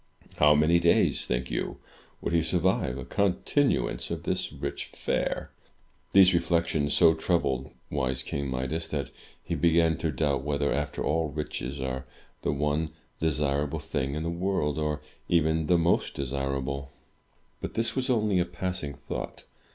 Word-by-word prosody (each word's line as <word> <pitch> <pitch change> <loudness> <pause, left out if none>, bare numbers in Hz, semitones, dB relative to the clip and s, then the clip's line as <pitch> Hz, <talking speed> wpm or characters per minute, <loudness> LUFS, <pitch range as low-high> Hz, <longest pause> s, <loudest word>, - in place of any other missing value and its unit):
How 75 0 +6
many 80 +3 +4
days, 85 0 +3
think 60 0 -1
you, - - -2 0.4
would - - -2
he 85 - +4
survive 85 -6 +1
a 65 - -6
continuance 100 +8 +1
of - - -4
this - - -1
rich - - -4
fare? - - -2 0.6
These 95 -1 +7
reflections 85 -4 +1
so 85 -2 +6
troubled 65 -4 0 0.2
wise 65 -2 -1
King 70 +1 -3
Midas, 65 +6 -2
that 70 -5 -3 0.3
he - - -3
began 80 -1 +3
to 80 - -1
doubt 70 -2 +1
whether, 70 0 0
after 75 0 -2
all, 80 0 +1
riches 70 -2 -4
are 65 0 -3 0.3
the - - 0
one 75 +2 0 0.3
desirable 75 -1 0
thing 70 -3 -2
in 80 - -2
the 85 - -1
world, 85 -4 0
or 75 -1 -1 0.3
even 80 -2 +2
the 90 - +5
most 85 +1 +2
desirable. 70 0 -2 0.7
But - - -5
this 115 +1 0
was 130 -1 -1
only 105 -6 +3
a 90 - +2
passing 90 -4 -4
thought. - - -6
75 Hz, 150 wpm, -28 LUFS, 70-85 Hz, 0.7 s, These